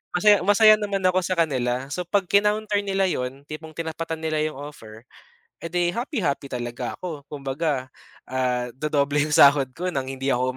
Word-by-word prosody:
masaya 205 +3 +5
masaya 215 +3 +6
naman 200 -2 -2
ako 185 0 +3
sa 185 0 -2
kanila. 130 -4 0
So 180 +3 -4
'pag 200 +1 +2
kinounter 210 +1 +2
nila 195 -1 0
'yon, 135 -6 -2
tipong 155 +2 -9
tinapatan 165 0 -4
nila 155 -1 0
'yong 155 - -7
offer, 120 -6 -10 0.6
edi 175 +1 -1
happy-happy 215 - -2
talaga 120 -1 -4
ako 155 -6 -7
kumbaga, 135 -1 -3 0.3
ah, 125 -1 -1
dodoble 145 +1 0
'yong 150 0 -1
sahod 140 -2 +6
ko 180 +1 -2
ng 135 -4 -3
hindi 135 0 -1
ako 130 +1 0
155 Hz, 165 wpm, -24 LUFS, 135-185 Hz, 0.6 s, masaya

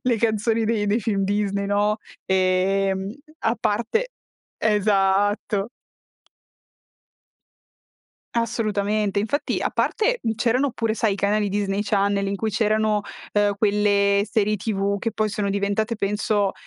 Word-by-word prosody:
le 245 -2 +2
canzoni 225 0 +1
dei 215 -2 0
dei 210 +3 +1
film 200 -2 0
Disney, 200 0 -1
no, 205 +1 +1 0.3
ehm, 190 +1 +1 0.3
a 225 +1 0
parte 235 - 0 0.5
esatto. 205 0 +1 2.7
Assolutamente, 215 -3 0
infatti 285 +8 -1
a - - 0
parte, - - 0
mhmm, 225 - 0
c'erano 250 +4 +2
oppure, 225 -3 -2
sai, 220 -2 +1
i - - -6
canali 205 +1 +1
Disney 200 0 -1
Channel 200 -1 +1
in 200 - -2
cui 220 +2 -2
c'erano, 215 0 +1 0.3
uhm, 205 -1 +2
quelle 200 -1 +3
serie 210 0 +1
TV 200 -1 -1
che 230 - -1
poi 215 0 -1
sono 205 -1 -2
diventate 200 +3 -1
penso 205 0 0
205 Hz, 125 wpm, -23 LUFS, 200-220 Hz, 2.7 s, quelle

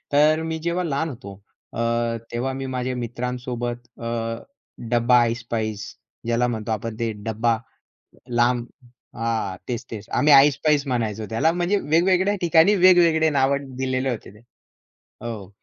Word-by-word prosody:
तर 155 +2 +4
मी 160 0 -3
जेव्हा 170 +2 -1
लहान 160 0 -1
होतो 120 -8 -9 0.4
अ, 115 0 0 0.2
तेव्हा 125 +3 -2
मी 135 0 -5
माझ्या 125 0 -2
मित्रांसोबत 120 0 -5
अ, 115 - -4 0.8
डब्बा 120 0 +4
ऐसपैस 115 -2 -3 0.4
ज्याला 120 +1 +2
म्हणतो 110 -2 -4
आपण 110 +1 -4
ते 115 -1 -1
डब्बा 110 +2 -1 0.7
लांब 120 0 +2 0.5
अ, - - -12
हां. 110 -4 -2
तेच-तेच 115 -3 -6
आम्ही 150 0 +3
डब्बा 135 - +10
ऐसपैस 150 0 +1
म्हणायचो 110 -4 -2
त्याला 115 +9 +2
म्हणजे 175 +3 0
वेगवेगळ्या 185 +6 +2
ठिकाणी 170 +3 +5
वेगवेगळे 175 -4 +5
नावं 140 -1 0
दिलेले 130 0 -1
होते 120 -6 -6
ते. - - -16 0.8
हो, 110 -5 -6
125 Hz, 140 wpm, -23 LUFS, 115-150 Hz, 0.8 s, डब्बा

